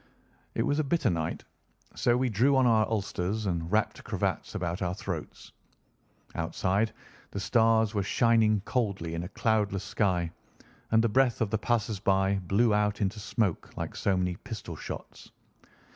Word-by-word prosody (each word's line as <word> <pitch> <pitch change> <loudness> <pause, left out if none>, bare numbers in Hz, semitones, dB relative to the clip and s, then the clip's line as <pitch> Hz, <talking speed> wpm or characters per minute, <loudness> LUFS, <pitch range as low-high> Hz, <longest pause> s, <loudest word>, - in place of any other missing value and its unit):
It - - +1
was 145 +1 +1
a - - +2
bitter 145 - +1
night, 80 -2 -2 0.5
so 120 0 +2
we 130 +1 +1
drew 125 +5 +3
on 130 -1 +4
our 110 -3 +4
ulsters 105 -1 -2
and 85 -2 -2
wrapped 110 +1 0
cravats - - -2
about 85 +2 -2
our 90 -1 -1
throats. 90 -6 -6 0.8
Outside, 95 +6 0 0.4
the 100 - -5
stars 110 0 +3
were 105 - +1
shining 110 0 +3
coldly 100 -8 -1
in 85 - -2
a 90 - -6
cloudless 105 -4 +1
sky, 90 -5 0 0.6
and 110 0 +4
the - - +4
breath 125 +1 +2
of 110 -3 0
the 110 - +1
passers 115 -2 0
by 95 0 +2
blew 110 +4 +3
out 105 0 +1
into 100 +1 -1
smoke 105 -3 -2
like - - -4
so 95 -2 +1
many 90 -1 -1
pistol 110 -9 -7
shots. - - -8
105 Hz, 160 wpm, -29 LUFS, 95-115 Hz, 0.8 s, on